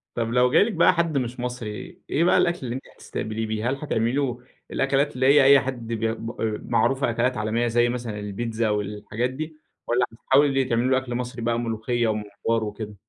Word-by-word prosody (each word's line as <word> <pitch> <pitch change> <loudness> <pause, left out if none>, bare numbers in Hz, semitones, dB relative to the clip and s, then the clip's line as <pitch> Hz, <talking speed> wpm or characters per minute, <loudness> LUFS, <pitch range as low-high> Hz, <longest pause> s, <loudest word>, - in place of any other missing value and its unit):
طب 115 -1 -1
لو 125 0 +4
جالِك 210 +1 +4
بقى - - +5
حد 170 -4 0
مش 125 -1 -3
مصري، 120 -4 -6
إيه 160 - +2
بقى 180 - +4
الأكل 175 +1 +2
اللي 120 - -3
أنتِ 130 - -6
هتستقبليه 110 +1 -4
بيه؟ 110 +2 -1
هل 135 - 0
هتعمِلي 120 -5 -1
له 130 -3 -1 0.3
الأكلات 135 +1 +1
اللي 130 - +1
هي 140 0 +7
أي 140 0 +8
حد 125 -3 -5
بي 115 -1 -1
م 115 0 -5
أ - - -16 0.3
معروفة 135 +3 +2
أكلات 120 +1 0
عالمية 110 +3 0
زي 120 +1 +3
مثلًا، 120 -4 -4
البيتزا 110 +2 -2
والحاجات 105 +3 -2
دي؟ 155 +4 -6 0.3
والّا 120 +1 +2
هتحاولي 135 +2 +3
تعملي 120 +1 +1
له 130 - +4
أكل 130 -2 -3
مصري 125 -1 -4
بقى 115 0 0
ملوخية، 115 +1 -1
ومُمبار 110 +1 -1
وكده؟ 105 0 -6
120 Hz, 195 wpm, -24 LUFS, 110-130 Hz, 0.3 s, أي